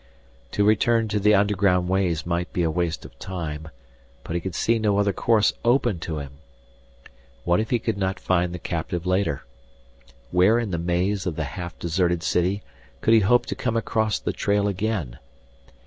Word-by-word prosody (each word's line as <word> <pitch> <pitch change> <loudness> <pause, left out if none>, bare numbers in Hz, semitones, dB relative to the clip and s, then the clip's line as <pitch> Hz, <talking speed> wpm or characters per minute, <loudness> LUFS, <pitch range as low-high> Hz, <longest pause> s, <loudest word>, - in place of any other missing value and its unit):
To 105 - +2
return 115 +2 +3
to 105 0 0
the 105 +1 +4
underground 100 -3 +2
ways 90 -4 0
might 85 0 -2
be 90 - 0
a 80 - +1
waste 85 -1 -2
of - - -14
time, 80 -4 -5 0.5
but - - -6
he 85 - -1
could 95 -1 -5
see 115 +5 +2
no 105 -2 +1
other 100 -1 +2
course 110 0 +3
open 120 -6 +2
to 80 -1 -4
him. 70 -1 -8 1.0
What 85 +2 +2
if 110 - -2
he 120 - +2
could 115 -3 -3
not 95 -1 -1
find 90 -1 +1
the 90 - -5
captive 85 0 -4
later? 90 -5 0 0.9
Where 95 +6 +4
in 115 -4 -2
the 85 - -1
maze 90 +3 0
of 85 - -2
the 80 - -2
half 85 +5 -6
deserted 85 0 0
city 95 +3 0 0.4
could 115 - +3
he 115 - +7
hope 120 +4 +3
to - - -3
come 115 -2 -1
across 110 -1 0
the - - -3
trail 100 0 +1
again? 100 - -2
95 Hz, 185 wpm, -24 LUFS, 85-105 Hz, 1.0 s, he